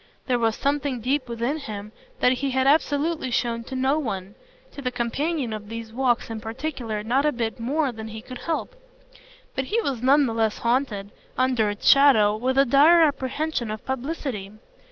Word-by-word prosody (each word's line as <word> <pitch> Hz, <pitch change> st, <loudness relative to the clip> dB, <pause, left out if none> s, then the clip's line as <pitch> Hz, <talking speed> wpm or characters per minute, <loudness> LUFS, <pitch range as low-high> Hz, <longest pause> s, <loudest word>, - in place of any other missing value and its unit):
There 250 Hz, -2 st, +1 dB
was 225 Hz, -1 st, +1 dB
something 280 Hz, -2 st, -1 dB
deep 255 Hz, +2 st, -1 dB
within 235 Hz, +5 st, -1 dB
him 210 Hz, -7 st, -7 dB, 0.3 s
that 250 Hz, -, +5 dB
he 270 Hz, +2 st, -1 dB
had 260 Hz, 0 st, +1 dB
absolutely 295 Hz, 0 st, +2 dB
shown 235 Hz, -1 st, -1 dB
to 265 Hz, -, -6 dB
no 265 Hz, +4 st, +1 dB
one 195 Hz, -8 st, -4 dB, 0.4 s
to 285 Hz, -, -9 dB
the 255 Hz, -, -1 dB
companion 250 Hz, +2 st, -2 dB
of 210 Hz, -1 st, -7 dB
these 225 Hz, -1 st, -7 dB
walks 245 Hz, -2 st, 0 dB
in 220 Hz, -1 st, -5 dB
particular 225 Hz, -2 st, -4 dB
not 250 Hz, +5 st, +1 dB
a 300 Hz, -, +3 dB
bit 235 Hz, -2 st, -3 dB
more 275 Hz, +4 st, 0 dB
than 220 Hz, -1 st, -8 dB
he 220 Hz, 0 st, -8 dB
could 255 Hz, -1 st, -9 dB
help; 335 Hz, +8 st, -3 dB, 0.8 s
but 265 Hz, -, -2 dB
he 445 Hz, -, 0 dB
was 270 Hz, -, -2 dB
none 280 Hz, +3 st, +5 dB
the 230 Hz, -, -2 dB
less 220 Hz, -1 st, 0 dB
haunted, 235 Hz, -5 st, -1 dB, 0.3 s
under 255 Hz, -4 st, +2 dB
its 205 Hz, 0 st, -4 dB
shadow, 260 Hz, -7 st, +6 dB
with 255 Hz, +4 st, -1 dB
a 275 Hz, -, +6 dB
dire 300 Hz, +6 st, +6 dB
apprehension 285 Hz, -3 st, -1 dB
of 215 Hz, 0 st, -6 dB
publicity. 265 Hz, -6 st, -4 dB
255 Hz, 185 wpm, -24 LUFS, 225-280 Hz, 0.8 s, shadow